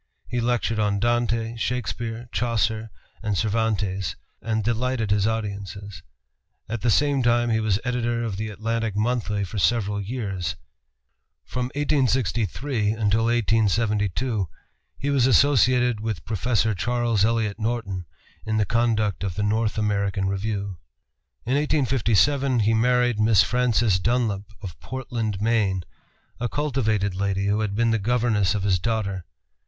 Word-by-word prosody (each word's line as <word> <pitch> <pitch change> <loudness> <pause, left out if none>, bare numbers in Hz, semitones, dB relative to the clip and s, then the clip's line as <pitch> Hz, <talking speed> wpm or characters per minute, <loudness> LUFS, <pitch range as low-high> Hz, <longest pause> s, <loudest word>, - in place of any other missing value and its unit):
He 120 -1 -2
lectured 115 -2 0
on 105 -1 +1
Dante, 115 0 0
Shakespeare, 120 -1 -3
Chaucer, 115 -2 0 0.3
and 105 -3 -1
Cervantes, 100 -5 0 0.3
and 110 -1 -1
delighted 120 -1 0
his 105 0 +3
audiences. 100 -3 -4 0.7
At 110 0 -4
the 120 - +1
same 140 +3 +3
time 120 -1 +2
he 110 - +2
was 110 -3 +1
editor 120 -1 -1
of 110 -4 -3
the 110 +2 -3
Atlantic 110 +1 -2
Monthly 105 -2 0
for 100 +2 -4
several 105 -1 +1
years. 100 -5 -3 0.9
From 125 -1 -2
1863 125 - 0
until 110 0 +1
1872 110 -1 +1 0.5
he 145 - -1
was 130 -3 +3
associated 125 -3 +4
with 110 -7 -4
Professor 110 0 +1
Charles 120 0 0
Eliot 110 -1 +1
Norton 110 -5 -2 0.4
in 110 0 -1
the 105 - +2
conduct 110 -3 +1
of 95 -4 -3
the 105 - -1
North 110 +1 0
American 100 -2 0
Review. 100 -1 -3 0.7
In 125 - 0
1857 135 -2 +2
he 110 +2 +3
married 125 0 +2
Miss 110 -1 +5
Frances 120 -5 +2
Dunlap 110 -2 0 0.2
of 90 -5 -7
Portland, 120 -6 -4
Me., 105 -4 +2 0.6
a 120 0 -1
cultivated 110 -9 0
lady 100 +1 -1
who 100 +1 +1
had 105 -2 -1
been 115 +1 +2
the 115 - +1
governess 110 -3 +1
of 100 - -2
his 95 -3 +2
daughter. 100 -4 -2
110 Hz, 135 wpm, -24 LUFS, 100-120 Hz, 0.9 s, Miss